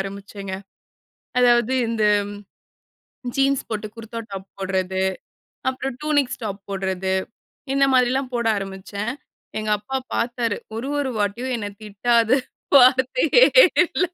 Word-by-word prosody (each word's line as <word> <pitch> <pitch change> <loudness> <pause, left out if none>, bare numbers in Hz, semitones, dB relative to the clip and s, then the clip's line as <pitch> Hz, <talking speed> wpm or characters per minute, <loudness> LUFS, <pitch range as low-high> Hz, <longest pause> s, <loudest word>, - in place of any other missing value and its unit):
ஆரம்பிச்சேங்க. 195 0 -6 0.9
அதாவது 240 0 +4
இந்த 225 -1 -1 1.3
ஜீன்ஸ் 275 0 +2
போட்டு, 215 -1 -3
குர்தா 230 0 -7
டாப் 195 -1 -7
போட்றது. 190 -1 -1 0.7
அப்புறம், 260 0 -4
டூனிக்ஸ் 290 -4 0
டாப் 200 -1 -5
போட்றது. 190 -1 -1 0.6
இந்த 275 0 +4
மாதிரில்லாம் 255 +1 +2
போட 235 -1 0
ஆரம்பிச்சேன். 200 +3 -5 0.5
எங்க 215 - -3
அப்பா 265 +6 -4 0.2
பாத்தாரு. 235 -2 -1 0.2
ஒரு 240 +4 -4
ஒரு 265 -3 -2
வாட்டியும், 230 +6 -1
என்ன 205 -2 -4
திட்டாத 230 +4 +2 0.4
வார்த்தயே 260 - +5 0.4
இல்ல. 365 - 0
230 Hz, 110 wpm, -22 LUFS, 200-255 Hz, 1.3 s, வார்த்தயே